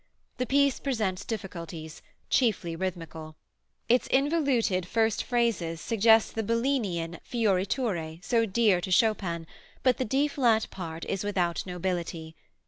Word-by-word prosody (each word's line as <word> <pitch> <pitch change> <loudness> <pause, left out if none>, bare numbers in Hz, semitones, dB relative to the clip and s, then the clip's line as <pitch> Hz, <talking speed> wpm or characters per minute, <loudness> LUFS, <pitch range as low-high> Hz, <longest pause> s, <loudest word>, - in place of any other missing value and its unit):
The 250 - -1
piece 280 -1 +3
presents 215 -8 -1
difficulties, 170 -7 -6 0.3
chiefly 195 -9 +1
rhythmical. 165 -3 -5 0.5
Its 245 +2 +3
involuted 265 - +1
first 225 +1 +1
phrases 230 -10 0
suggest 225 +2 +4
the 225 - -1
Bellini 230 -4 0
an 165 0 -5
fioriture 195 -5 -1
so 230 -2 +2
dear 200 -3 +3
to 190 - -4
Chopin, 185 -4 +1 0.4
but 255 -2 +3
the 260 - -1
D 275 +6 +2
flat 240 -6 +2
part 165 -3 -6
is 195 -1 -2
without 180 -4 0
nobility. 175 -3 -3
200 Hz, 130 wpm, -28 LUFS, 170-235 Hz, 0.5 s, suggest